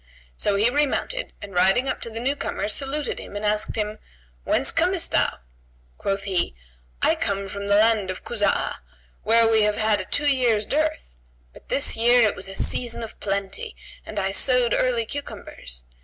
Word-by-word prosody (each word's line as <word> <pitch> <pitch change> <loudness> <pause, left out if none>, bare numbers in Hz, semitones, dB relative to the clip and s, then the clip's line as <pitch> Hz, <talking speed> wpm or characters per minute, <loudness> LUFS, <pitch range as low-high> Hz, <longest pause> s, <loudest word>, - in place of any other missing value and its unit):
So 200 - +1
he 210 +3 +3
remounted 295 - -1
and 200 -1 -8
riding 195 +8 +3
up - - -2
to - - -2
the 225 0 -5
new 265 +4 0
comer, 245 - -3
saluted 275 +7 -2
him - - -9
and 205 +1 -3
asked 210 0 0
him, 215 -1 -2 0.5
"Whence - - +2
comest - - +1
thou?" - - +2 0.6
Quoth 195 0 -1
he, 185 - -1 0.5
"I - - +5
come 200 0 -2
from 200 +1 -5
the 200 - +4
land 215 -2 +3
of 185 - -5
Kuzб'ah, 210 -4 0 0.4
where 230 +1 +5
we 225 -1 +4
have 210 0 +2
had 215 -2 +2
a - - -7
two 290 - 0
years' 245 -7 +3
dearth; 310 - -1 0.4
but - - -17
this 275 - +1
year 240 0 +5
it - - -1
was 185 - -6
a 195 - -7
season 235 +3 -2
of 225 - -9
plenty 195 -1 -3 0.3
and 215 - -9
I 195 -1 0
sowed 250 +2 +3
early 240 -3 +1
cucumbers. - - -7
215 Hz, 185 wpm, -24 LUFS, 200-245 Hz, 0.6 s, I